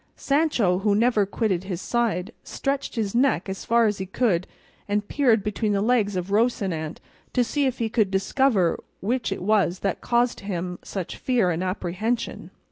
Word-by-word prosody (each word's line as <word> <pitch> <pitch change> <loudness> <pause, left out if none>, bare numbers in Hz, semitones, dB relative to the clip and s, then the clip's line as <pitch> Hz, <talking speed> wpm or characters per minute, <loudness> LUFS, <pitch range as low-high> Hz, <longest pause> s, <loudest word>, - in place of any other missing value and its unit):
Sancho 275 - +2
who 200 0 +2
never 220 -2 +3
quitted 195 -4 -1
his 185 -3 -4
side, 225 -3 -1
stretched 275 0 -3
his 215 -4 -1
neck 245 -7 +2
as 190 0 -5
far 235 0 +4
as 210 -2 0
he 190 - -4
could 190 -4 +1 0.4
and 205 0 -1
peered 240 -8 +3
between 210 0 -1
the 200 - +1
legs 215 -4 +2
of 180 +1 -3
Rocinante 195 -8 0 0.4
to 250 - +3
see 280 +4 0
if 260 - -2
he 230 - 0
could 220 -2 +2
now - - -13
discover 195 -1 +2 0.2
what 235 +4 -1
it - - -3
was 195 -3 +2
that 195 -2 -1
caused 240 0 +1
him 180 -3 -4
such 190 -4 -5
fear 235 -8 +1
and 170 +2 -2
apprehension. 185 +5 -2
210 Hz, 180 wpm, -24 LUFS, 190-240 Hz, 0.4 s, far